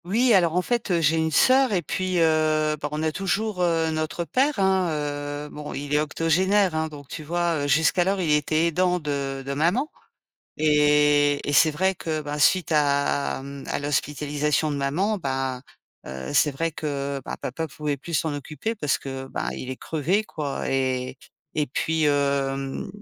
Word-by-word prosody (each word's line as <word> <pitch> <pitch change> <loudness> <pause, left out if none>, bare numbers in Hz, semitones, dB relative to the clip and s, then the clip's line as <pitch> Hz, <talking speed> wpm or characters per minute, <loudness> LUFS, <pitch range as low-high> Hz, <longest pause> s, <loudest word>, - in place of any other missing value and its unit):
Oui, 230 +6 +3
alors, 175 -4 +3
en 180 - +2
fait, 240 0 -1
heu, 175 -2 +2
j'ai 160 0 +2
une 160 0 +1
sœur 255 - +4
et 180 -3 +1
puis, 185 +4 -2
heu, 155 -1 +2
bah, 145 - -2
on 150 +1 -3
a 160 - +1
toujours, 195 +3 -1
heu, 165 -2 +1
notre 155 +2 -2
père, 265 - +1
hein, 190 -2 +2 0.6
heu, - - -10
bon, 150 0 -7
il 145 +1 -4
est 150 - +4
octogénaire, 180 +5 +2
hein, 160 0 0
donc, 145 -3 -11
tu 155 - -7
vois, 170 -1 0
heu, - - -1
jusqu'alors, 175 +6 +2
il 165 -4 0
était 155 +2 +2
aidant 180 +2 +1
de 140 -3 -3
de 140 - -3
maman. 180 - +1 0.7
Et 150 -1 +3
et - - 0
c'est 155 +2 +5
vrai 190 +5 +1
que, 160 -2 -3
bah, 150 0 -5
suite 170 +3 +3
à, 140 -2 +1
mmh, 140 0 -8
à - - -1
l'hospitalisation 150 +1 -1
de 145 - -2
maman, 175 +10 0
ben, 135 -5 -3 0.4
heu, 65 0 -6
c'est 150 +2 +4
vrai 165 +4 -2
que, 140 -2 -3
bah, - - -4
papa 160 +6 -3
pouvait 150 -1 -3
plus 165 +5 -9
s'en 160 0 +1
occuper 150 +10 -4
parce 150 -9 0
que, 135 -1 -6
bah, 135 - -3
il 130 - -6
est 130 - -6
crevé, 165 +7 0
quoi. 150 -8 -4
Et 130 -1 -1 0.4
et 150 - +1
puis, 160 +4 -1
hem, 140 -2 0
155 Hz, 185 wpm, -24 LUFS, 140-175 Hz, 0.7 s, c'est